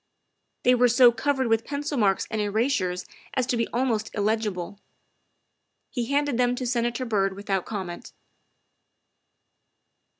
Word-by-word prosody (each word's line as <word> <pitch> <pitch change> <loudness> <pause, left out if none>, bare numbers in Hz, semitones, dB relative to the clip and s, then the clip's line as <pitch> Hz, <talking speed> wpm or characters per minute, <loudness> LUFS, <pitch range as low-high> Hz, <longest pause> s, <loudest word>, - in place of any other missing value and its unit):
They 250 - +5
were 250 0 +5
so 245 +1 +6
covered 265 +3 0
with 225 -1 +2
pencil 290 +1 -3
marks 200 -6 +2
and 220 -1 -1
erasures 205 -4 0 0.3
as 255 -2 +1
to 250 - 0
be 230 -1 0
almost 230 -3 -1
illegible. 205 -3 -1 1.1
He 240 -3 -2
handed 285 -2 0
them 245 0 +2
to 255 - -4
Senator 240 +1 -1
Byrd 195 -4 0
without 195 -2 -2
comment. 190 -5 -6
230 Hz, 130 wpm, -25 LUFS, 205-250 Hz, 1.1 s, so